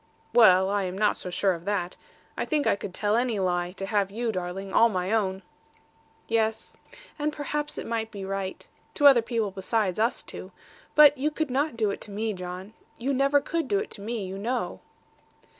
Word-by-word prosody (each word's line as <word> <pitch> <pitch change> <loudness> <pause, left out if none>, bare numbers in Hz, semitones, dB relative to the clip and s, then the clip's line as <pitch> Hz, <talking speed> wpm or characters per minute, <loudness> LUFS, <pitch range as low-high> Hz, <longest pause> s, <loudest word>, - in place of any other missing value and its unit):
'Well, 190 -5 +6
I 200 0 0
am 185 +1 -4
not 210 0 +2
so - - -6
sure 190 +1 +1
of 170 0 -8
that. 200 -3 -1 0.4
I - - -1
think 300 -2 0
I - - +3
could 200 - -7
tell 205 +3 0
any 240 -2 +1
lie, 175 -2 0
to 195 0 -5
have 200 -1 +1
you, 230 +3 -2
darling, 185 0 -5
all 230 - +6
my 185 -1 -2
own.' 195 -4 0 0.8
'Yes. 225 -1 -1 0.4
And 300 +1 0
perhaps 295 0 -3
it - - -4
might 225 -1 -2
be 200 -3 -7
right. 195 -1 -4 0.3
To 290 - +1
other 270 -4 +8
people 225 -3 -2
besides 195 0 -1
us 230 +3 +1
two. - - -9 0.4
But 295 -2 +7
you 295 +3 +1
could 310 -2 -3
not 280 0 0
do 215 -3 +1
it - - -6
to - - -6
me, 215 +2 -2
John. 185 +2 -7 0.2
You 265 +4 -1
never 275 +2 +3
could 330 +2 -2
do 405 - +1
it 420 - -3
to - - -6
me, 220 -1 -3
you 190 +1 -6
know.' 245 +5 -2
215 Hz, 205 wpm, -26 LUFS, 190-245 Hz, 0.8 s, other